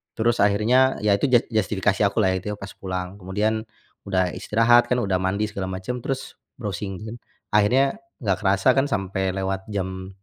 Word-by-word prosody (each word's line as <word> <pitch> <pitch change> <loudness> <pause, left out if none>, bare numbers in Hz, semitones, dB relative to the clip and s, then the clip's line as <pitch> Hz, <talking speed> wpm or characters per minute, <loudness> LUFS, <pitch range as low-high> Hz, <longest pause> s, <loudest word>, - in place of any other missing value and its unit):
Terus 115 +1 +1
akhirnya, 115 +6 +4
ya 105 - +3
itu 120 +8 +2
jat 120 -2 +4
justifikasi 105 -2 0
aku 100 - -7
lah 95 -1 +3
ya - - 0
itu - - -9
pas 100 -1 -8
pulang. 95 +1 -5
Kemudian 105 +4 -1 0.4
udah 95 -2 +1
istirahat 120 +2 +3
kan, 125 - +2
udah 95 -2 0
mandi 95 +3 0
segala 95 -1 -4
macam 95 +7 -4
terus 135 +2 -5 0.2
browsing 100 -3 -4
kan. 110 +1 -6 0.4
Akhirnya 130 - +3 0.2
gak 100 -2 0
kerasa 100 +4 +3
kan 135 +2 +1
sampai 95 -3 -1
lewat 95 0 -3
jam 95 -2 -4
100 Hz, 175 wpm, -23 LUFS, 95-115 Hz, 0.4 s, akhirnya